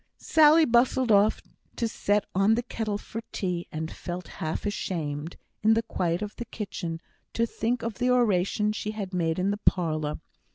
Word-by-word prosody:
Sally 315 0 +6
bustled 245 0 +3
off 205 +1 +4 0.3
to 230 - 0
set 210 -1 0
on 195 +4 +4
the 240 - -1
kettle 220 -4 -3
for 225 +2 -7
tea, 180 -3 -2
and 160 +1 -4
felt 175 0 -6
half 160 +5 -2
ashamed, 165 -6 -3 0.2
in 220 +1 +5
the 225 - +1
quiet 175 -4 -1
of 210 - -6
the 240 - -5
kitchen, 175 -7 -5 0.3
to 230 - +2
think 235 +1 -2
of 230 -2 -4
the 250 0 +2
oration 210 -4 +2
she 215 0 -4
had 195 -3 -4
made 165 -3 0
in 190 +2 +1
the 205 - -2
parlour. 155 -7 0
205 Hz, 175 wpm, -27 LUFS, 175-230 Hz, 0.3 s, Sally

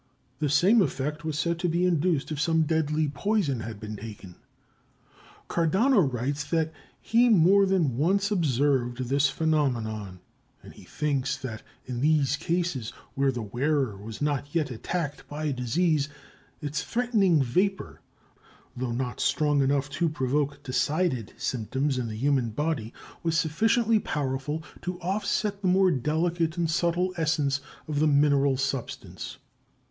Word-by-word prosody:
The 150 -2 0
same 185 - +5
effect 150 -1 -2
was 155 -2 -3
said 170 +2 0
to 175 -1 0
be 170 +2 +1
induced 170 -3 +1
if 150 -1 -2
some 160 0 +3
deadly 155 -1 +1
poison 145 - 0
had 110 -2 -6
been 105 0 -6
taken. 105 -4 -9 1.1
Cardano 195 - +3
writes 140 -1 0
that 160 +1 0 0.3
he 240 +2 +3
more 195 0 +5
than 165 -11 +1
once 195 +7 +2
observed 135 - +1
this 140 0 +3
phenomenon, 115 - -1 0.4
and - - -12
he - - -15
thinks 140 -2 -1
that 125 -5 -6 0.2
in 125 -1 -4
these 145 -2 +3
cases, 165 -6 -1 0.2
where 135 0 +2
the 120 -3 -4
wearer 130 +1 0
was 105 +6 -7
not 145 0 -2
yet 155 -5 +1
attacked 145 +5 -4
by 150 0 -2
disease, 140 +4 +1 0.5
its 150 0 -2
threatening 210 - +2
"vapor," 185 +10 -1 0.7
though 125 -1 -3
not 125 0 -3
strong 145 0 +2
enough 140 0 +1
to 165 +3 0
provoke 145 0 -1
decided 135 - 0
symptoms 130 +3 -1
in 120 - -2
the 110 - -5
human 130 -1 +1
body, 120 -2 -2 0.3
was 165 -1 0
sufficiently 220 - +2
powerful 145 -1 -3 0.2
to 180 0 -4
offset 200 +2 -1
the 190 - 0
more 185 0 +4
delicate 165 +4 0
and 165 -2 0
subtle 175 +2 +1
essence 150 -3 +1 0.3
of 150 -2 -1
the 155 - +4
mineral 140 -2 +3
substance. 135 -1 -4
150 Hz, 140 wpm, -27 LUFS, 135-170 Hz, 1.1 s, same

